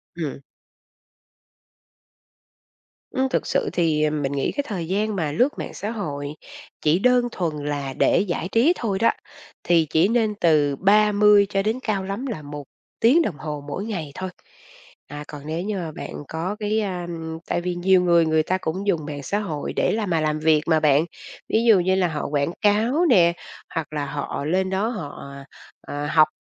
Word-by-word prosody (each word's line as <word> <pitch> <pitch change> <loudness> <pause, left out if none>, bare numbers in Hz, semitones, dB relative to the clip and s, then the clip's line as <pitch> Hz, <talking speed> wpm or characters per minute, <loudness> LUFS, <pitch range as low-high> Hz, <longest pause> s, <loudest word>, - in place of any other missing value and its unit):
Ừm. 160 -5 -4 2.7
Ừm, 265 0 0
thực - - -1
sự - - 0
thì, 160 -3 +1
ờm, 150 -1 0
mình 135 -1 -1
nghĩ 140 -1 -1
cái 285 - -2
thời 180 -6 -4
gian 210 +3 0
mà 160 -6 -1
lướt 255 - +1
mạng - - -5
xã 210 - -4
hội 145 -10 -4 0.5
chỉ 155 +3 +3
đơn 250 +2 +3
thuần 155 -7 -3
là 145 -2 -3
để - - +3
giải 180 -3 -2
trí 255 +10 +4
thôi 205 - -2
đó, 230 - +4 0.5
thì 170 -2 +3
chỉ 160 +4 +3
nên 220 -2 +1
từ 150 -7 +3
30 210 +3 +5
cho 195 -1 +1
đến 220 +4 0
cao 200 -3 -1
lắm 195 +7 -4
là 225 - -4
1 145 0 -7 0.4
tiếng 265 +9 +5
đồng 195 - -2
hồ 150 -2 -5
mỗi 180 +8 -4
ngày 175 -10 -4
thôi. 185 0 -4 0.8
À, 145 +1 -7
còn 150 -2 -9
nếu 160 +2 -3
như 205 +2 -3
mà 170 -4 -4
bạn 145 - -7
có 170 +5 -3
cái, 215 +1 0
a, 190 -4 -2
ừm, 160 -1 -6
tại - - -1
vì 180 0 -2
nhiều 185 +1 +4
người 170 -2 +4
người 160 0 +2
ta 185 +4 0
cũng 190 +5 -3
dùng 165 -6 +1
mạng 145 -1 -6
xã 200 +9 -1
hội 160 -9 -4
để - - +1
làm 215 -3 -1
mà 165 -2 +1
làm 155 0 0
việc 155 -1 +3
mà 160 -1 +4
bạn, 150 0 +3 0.4
ví 225 - +2
dụ 225 -5 +6
như 185 +2 +2
là 190 -2 +2
họ 155 -3 -3
quảng 145 +2 0
cáo 225 +11 +3
nè, 170 -7 +5 0.4
hoặc 155 -2 -3
là 145 -1 -2
họ 140 0 -4
lên 185 +4 +1
đó 195 +3 0
họ, 180 -12 -6 0.6
ờ, 145 0 -5
học, 155 0 +5
175 Hz, 195 wpm, -23 LUFS, 155-210 Hz, 2.7 s, dụ